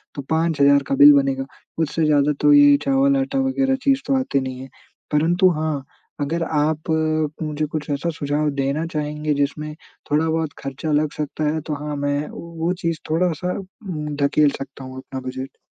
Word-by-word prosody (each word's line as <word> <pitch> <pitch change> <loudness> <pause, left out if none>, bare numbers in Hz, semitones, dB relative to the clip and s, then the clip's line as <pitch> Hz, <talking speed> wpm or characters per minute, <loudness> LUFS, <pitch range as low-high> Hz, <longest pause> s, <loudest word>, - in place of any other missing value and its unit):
तो 140 - -4
5,000 150 -4 +3
का - - 0
बिल 145 +2 +9
बनेगा। 135 -1 +1 0.3
उससे 160 0 0
ज़्यादा 150 -1 +3
तो 295 - +5
ये 290 0 +7
चावल-आटा 275 0 +2
वग़ैरह 265 0 +1
चीज़ 275 -1 +3
तो 275 - +2
आती 255 - 0
नहीं 130 -1 -5
है। 135 - -8 0.4
परंतु 175 +5 +3
हाँ, 155 -3 -2 0.4
अगर 165 +4 -1
आप 155 +1 -1 0.5
मुझे 155 0 -2
कुछ 150 0 -5
ऐसा 145 +4 -1
सुझाव 145 +1 0
देना 140 +4 -1
चाहेंगे 150 0 -2
जिसमे 145 +2 -2 0.4
थोड़ा 155 +2 +2
बहुत 160 -2 -1
खर्चा 135 +3 -4
लग 150 0 +1
सकता 150 0 -3
है 160 - -2
तो 155 - -1
हाँ 150 -1 -3
मैं 145 +1 -1
वो 170 +1 -4
चीज़ 165 -2 -1
थोड़ा-सा 180 +1 0
उम, 185 -7 -6
धकेल 145 +1 +4
सकता 135 0 -8
हूँ 130 0 -9
अपना 130 0 -7
बजट। 130 +1 -7
150 Hz, 170 wpm, -21 LUFS, 145-170 Hz, 0.5 s, बिल